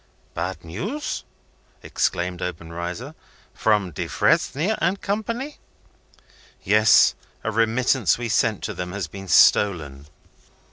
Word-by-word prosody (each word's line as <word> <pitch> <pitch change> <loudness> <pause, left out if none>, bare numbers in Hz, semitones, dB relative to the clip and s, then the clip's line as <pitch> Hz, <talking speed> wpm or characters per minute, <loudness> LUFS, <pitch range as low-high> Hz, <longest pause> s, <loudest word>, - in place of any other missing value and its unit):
"Bad 90 +1 -4
news," 200 - -4 0.6
exclaimed 90 0 -1
Obenreizer. 85 - -5 0.4
"From 105 -4 +1
Defresnier 160 - +1
and 195 +2 +1
Company?" 230 +8 -3 1.0
"Yes. 105 +1 +5 0.3
A 110 - -1
remittance 115 - +2
we 120 -1 -4
sent 110 -1 +1
to - - -3
them 90 0 -5
has 100 -3 -3
been 95 +4 -10
stolen. 75 -7 +3
105 Hz, 100 wpm, -23 LUFS, 90-130 Hz, 1.0 s, Yes